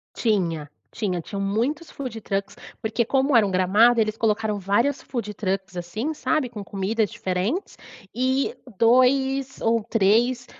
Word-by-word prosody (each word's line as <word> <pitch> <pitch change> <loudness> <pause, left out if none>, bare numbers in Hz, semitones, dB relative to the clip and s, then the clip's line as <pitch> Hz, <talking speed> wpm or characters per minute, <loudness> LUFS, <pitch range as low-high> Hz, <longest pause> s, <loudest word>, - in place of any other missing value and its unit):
Tinha 170 -9 0 0.2
tinha 190 -5 -2
tinham 195 +4 -5
muitos 240 +11 -1
foodtrucks, 220 -7 -4 0.2
porque 220 +2 0
como 270 +3 +1
era 225 -3 +6
um - - -1
gramado 205 +6 +4
eles 215 -1 +1
colocaram 215 -1 0
várias 230 +9 +1
foodtrucks 195 -5 -4
assim, 215 - -3
sabe? 305 -3 0
Com 215 -4 -7
comidas 200 +2 -1
diferentes, 190 - -2 0.4
e 260 - 0 0.2
2 265 +3 +3
ou 230 -1 +2
3, 235 +3 +2
225 Hz, 130 wpm, -24 LUFS, 195-255 Hz, 0.4 s, era